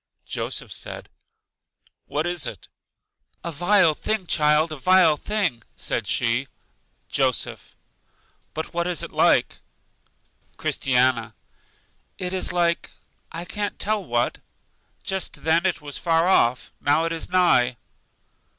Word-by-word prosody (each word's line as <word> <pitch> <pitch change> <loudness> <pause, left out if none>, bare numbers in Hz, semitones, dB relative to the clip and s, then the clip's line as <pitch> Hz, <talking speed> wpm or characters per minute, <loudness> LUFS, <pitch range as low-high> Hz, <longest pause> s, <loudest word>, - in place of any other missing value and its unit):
Joseph - - -3
said, - - -7 1.0
What 150 +2 -1
is 175 -5 -1
it? - - -8 0.8
A 170 - -3
vile 175 +1 +4
thing, 215 +4 -2
child, 155 0 +3
a - - -4
vile 185 +2 +5
thing! 195 - -1 0.2
said - - -2
she. 120 +3 +1 0.6
Joseph: - - 0 0.8
But 160 +1 -5
what 170 0 0
is 175 -4 -2
it - - -6
like? - - +3 1.0
Christiana: 125 -4 +1 0.8
It 180 0 -3
is 185 - -1
like 170 -1 +1 0.4
I 170 +1 -5
can't 205 +2 -3
tell 210 0 0
what. 120 -6 -1 0.6
Just 190 -1 -3
then 165 +3 +3
it 180 - -2
was 145 -1 -6
far 165 0 +2
off, 125 -9 +2
now 150 +3 +3
it 165 - -1
is 165 -1 -4
nigh. 130 -10 +3
165 Hz, 125 wpm, -24 LUFS, 140-180 Hz, 1.0 s, vile